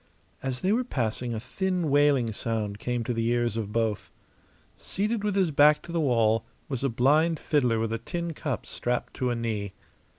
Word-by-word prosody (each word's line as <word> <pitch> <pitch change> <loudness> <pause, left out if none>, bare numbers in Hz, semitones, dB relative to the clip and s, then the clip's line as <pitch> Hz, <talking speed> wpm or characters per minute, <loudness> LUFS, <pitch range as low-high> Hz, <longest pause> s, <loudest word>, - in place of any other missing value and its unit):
As 130 -2 -3
they 190 - +2
were 240 +4 +2
passing 120 - -2
a - - -2
thin, 180 - -1
wailing 140 -5 +3
sound 105 -2 -3
came 120 +1 -2
to 120 - -2
the 115 0 -1
ears 120 -2 +1
of 110 -3 -3
both. 110 -2 -1 0.7
Seated 210 +2 -2
with 205 -2 0
his 185 -5 +2
back 150 +1 +5
to 170 - -9
the 170 -1 0
wall 115 -5 +3 0.2
was 135 -2 -4
a 135 - +2
blind 150 +8 +3
fiddler 125 -7 +2
with 110 0 -1
a 115 - -2
tin 170 +7 -4
cup 145 -4 -3
strapped 125 0 -3
to 125 - -1
a 120 - 0
knee. 110 -4 -3
125 Hz, 195 wpm, -27 LUFS, 115-155 Hz, 0.7 s, back